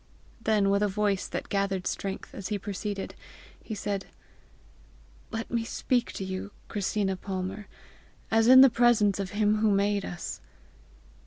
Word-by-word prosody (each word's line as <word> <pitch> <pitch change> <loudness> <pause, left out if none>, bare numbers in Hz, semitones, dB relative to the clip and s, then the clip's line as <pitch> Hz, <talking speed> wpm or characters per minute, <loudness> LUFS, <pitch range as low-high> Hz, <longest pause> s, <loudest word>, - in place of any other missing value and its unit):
Then, 210 -3 +2
with 200 0 +2
a 210 - +3
voice 200 -1 0
that - - -4
gathered 195 -2 -1
strength 195 -1 -4
as 200 - -5
he 210 - -1
proceeded, 200 0 -4 0.5
he 220 - -5
said: 200 -1 -3 1.2
"Let 225 0 -5
me 235 -1 0
speak 245 +1 0
to - - -4
you, 190 +1 -4 0.2
Christina 200 -1 -1
Palmer, 190 +1 -5 0.6
as 225 0 +4
in 260 +1 +10
the 270 -2 +8
presence 230 -4 +3
of 195 -2 -2
him 210 0 +3
who 215 0 +3
made 200 0 +2
us! 175 - -6
205 Hz, 150 wpm, -28 LUFS, 195-220 Hz, 1.2 s, in